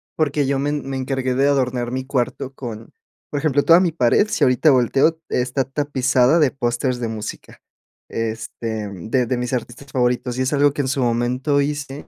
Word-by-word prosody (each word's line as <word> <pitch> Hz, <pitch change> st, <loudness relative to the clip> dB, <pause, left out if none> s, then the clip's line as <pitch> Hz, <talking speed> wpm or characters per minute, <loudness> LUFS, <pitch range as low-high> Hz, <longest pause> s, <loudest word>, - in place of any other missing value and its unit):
Porque 145 Hz, -2 st, +1 dB
yo 135 Hz, -1 st, 0 dB
me 145 Hz, -, 0 dB
en 145 Hz, -2 st, -3 dB
me 135 Hz, -, -3 dB
encargué 130 Hz, -1 st, -2 dB
de 135 Hz, +2 st, +3 dB
adornar 125 Hz, -3 st, 0 dB
mi 130 Hz, +1 st, -3 dB
cuarto 130 Hz, 0 st, -2 dB
con 115 Hz, -4 st, -8 dB, 0.4 s
Por 145 Hz, -, -2 dB
ejemplo, 145 Hz, -1 st, +1 dB
toda 165 Hz, +4 st, +6 dB
mi 180 Hz, -3 st, +1 dB
pared, 155 Hz, -, +3 dB
si -, -, 0 dB
ahorita 130 Hz, +4 st, +4 dB
volteo, 135 Hz, +6 st, +3 dB
está 125 Hz, +2 st, 0 dB
tapizada 135 Hz, +1 st, +2 dB
de 145 Hz, -5 st, +3 dB
pósteres 120 Hz, 0 st, -1 dB
de 115 Hz, -2 st, -2 dB
música. 110 Hz, -1 st, -7 dB, 0.5 s
Este, 110 Hz, -1 st, -4 dB
mm, 100 Hz, +1 st, -9 dB
de 125 Hz, -1 st, +2 dB
de 125 Hz, +1 st, -1 dB
mis 125 Hz, 0 st, -3 dB
artistas 130 Hz, +2 st, -5 dB
favoritos. 125 Hz, 0 st, 0 dB
Y -, -, +2 dB
es 130 Hz, -, -1 dB
algo 145 Hz, 0 st, +4 dB
que 145 Hz, -, -2 dB
en -, -, -3 dB
su 135 Hz, 0 st, -1 dB
momento 125 Hz, +4 st, +1 dB
hice, 145 Hz, -1 st, -3 dB
130 Hz, 200 wpm, -21 LUFS, 120-140 Hz, 0.5 s, toda